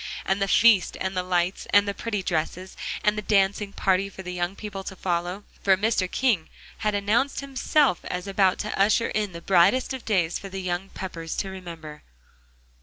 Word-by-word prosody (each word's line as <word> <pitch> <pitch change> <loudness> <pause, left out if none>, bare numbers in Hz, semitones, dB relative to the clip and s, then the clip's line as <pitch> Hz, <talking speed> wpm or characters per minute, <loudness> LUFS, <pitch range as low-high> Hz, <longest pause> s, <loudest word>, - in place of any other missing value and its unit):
And 190 +1 0
the 195 - +2
feast 205 -3 +4
and 190 0 -2
the 180 - +1
lights, 180 0 -1
and 205 0 +5
the 200 - -1
pretty 210 -2 -3
dresses, 180 +2 -2 0.3
and 210 0 +3
the 210 - -2
dancing 200 0 +1
party 195 0 +1
for 190 - -10
the 180 0 -5
young 175 +1 -2
people 200 -2 -6
to 190 - -6
follow. 180 +2 -2 0.2
For 190 -1 +4
Mr. 205 -3 +1
King 220 -11 +1 0.3
had 210 -2 0
announced 225 +9 +1
himself 275 - +2
as 180 0 -4
about 195 -2 +2
to 215 - -3
usher 215 +3 +3
in 210 -2 -1
the 170 - -8
brightest 195 +10 +3
of 260 - -6
days 180 -6 +1
for 195 - -8
the 190 0 -5
young 180 +2 -3
Peppers 165 -3 -6
to 195 - -3
remember. 165 -5 -9
195 Hz, 190 wpm, -25 LUFS, 180-210 Hz, 0.3 s, and